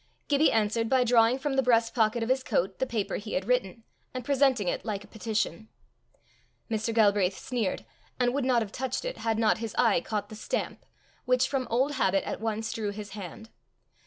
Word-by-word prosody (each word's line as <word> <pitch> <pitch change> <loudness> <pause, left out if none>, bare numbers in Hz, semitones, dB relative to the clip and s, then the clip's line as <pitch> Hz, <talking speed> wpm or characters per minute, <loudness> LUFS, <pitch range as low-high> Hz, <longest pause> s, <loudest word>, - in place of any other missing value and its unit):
Gibbie 290 +2 +4
answered 225 +1 +1
by 260 -1 +4
drawing 235 0 +4
from 270 +1 -2
the 270 - +3
breast 230 -2 +2
pocket 225 0 +2
of 225 - -3
his 260 +1 +2
coat 190 -3 -1
the 260 - 0
paper 220 -5 -2
he 210 +1 -7
had 185 - -1
written, 230 -2 0 0.3
and 255 -2 -4
presenting 270 -7 +2
it - - -1
like 205 -3 -3
a - - -15
petition. 220 +1 -3 1.0
Mr. 220 +1 0
Galbraith 205 -4 +3
sneered, 235 -7 -2 0.3
and 245 -1 +2
would 280 0 0
not 250 -3 +3
have 200 - -9
touched 260 - -3
it - - -4
had 225 -1 0
not 220 -1 +2
his 225 -2 -5
eye 225 -8 +4
caught 210 +1 -3
the 215 - -9
stamp, 215 - -4 0.4
which 255 0 +3
from 265 -3 -2
old 260 +5 +2
habit 195 -8 +1
at - - -4
once 225 0 -2
drew 215 -2 -2
his 205 0 -7
hand. 210 +2 -9
225 Hz, 200 wpm, -28 LUFS, 210-255 Hz, 1.0 s, Gibbie